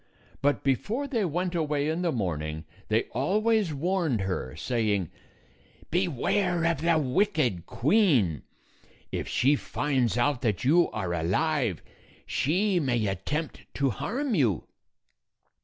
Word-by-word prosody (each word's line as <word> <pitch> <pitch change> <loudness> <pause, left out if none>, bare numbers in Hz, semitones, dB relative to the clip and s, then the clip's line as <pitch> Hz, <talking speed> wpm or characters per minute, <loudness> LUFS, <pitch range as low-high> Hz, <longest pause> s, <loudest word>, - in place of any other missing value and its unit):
But 145 +1 +1
before 210 - 0
they 235 -6 0
went 175 +2 -1
236 175 - -2
away 150 -2 0
in 160 +3 -1
the 175 -2 +1
morning, 80 - -3 0.2
they 110 +1 +2
always 210 - +1
warned 160 - 0
her, 90 -9 -3
saying, 105 -3 -1 0.8
"Beware 175 +1 +1
of 165 -3 +1
the 165 0 +3
wicked 140 - +1
queen! 130 - +2 0.7
If - - -3
she 140 +4 +3
finds 130 -6 -1
out 125 +1 +1
that 110 -7 0
you 165 +7 +4
are 90 -2 -3
alive, 100 - 0 0.4
she 185 +6 +1
may 120 -7 0
attempt 125 - -3
to 140 -2 +1
harm 255 - -2
you." 120 - +2
145 Hz, 125 wpm, -27 LUFS, 110-175 Hz, 0.8 s, you